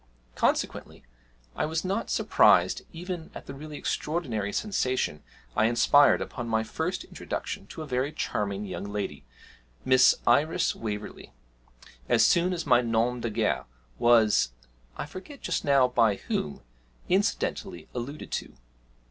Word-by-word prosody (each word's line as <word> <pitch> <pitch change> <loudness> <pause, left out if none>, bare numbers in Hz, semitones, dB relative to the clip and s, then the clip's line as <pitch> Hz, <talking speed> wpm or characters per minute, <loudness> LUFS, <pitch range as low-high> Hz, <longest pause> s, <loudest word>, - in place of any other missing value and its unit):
Consequently - - -1 0.5
I - - 0
was 160 +2 -2
not 190 +2 -2
surprised - - +4
even 175 -1 -6
at - - -8
the 135 - -7
really 150 +2 -8
extraordinary 125 - -2
sensation 130 - -1 0.3
I 110 - +3
inspired 120 +5 +5
upon 120 - -6
my 110 0 +1
first - - -3
introduction 100 - -6
to 160 - -7
a - - -7
very 130 +1 -1
charming 100 -7 -2
young 100 0 -5
lady, 100 -10 -4 0.6
Miss 130 0 +6
Iris 145 +7 +3
Waverley, 105 - -6 0.8
as - - +5
soon 175 +1 +3
as 170 -3 -3
my 120 -1 +5
nom 120 +1 0
de 115 - -1
guerre 110 0 0 0.3
was 110 - +4 0.4
(I - - -3
forget 190 - -10
just - - -1
now 140 -3 +4
by 115 -4 +3
whom) 75 -6 -3 0.5
incidentally 195 0 -1
alluded 130 +5 -6
to. - - -4
125 Hz, 135 wpm, -27 LUFS, 110-155 Hz, 0.8 s, Miss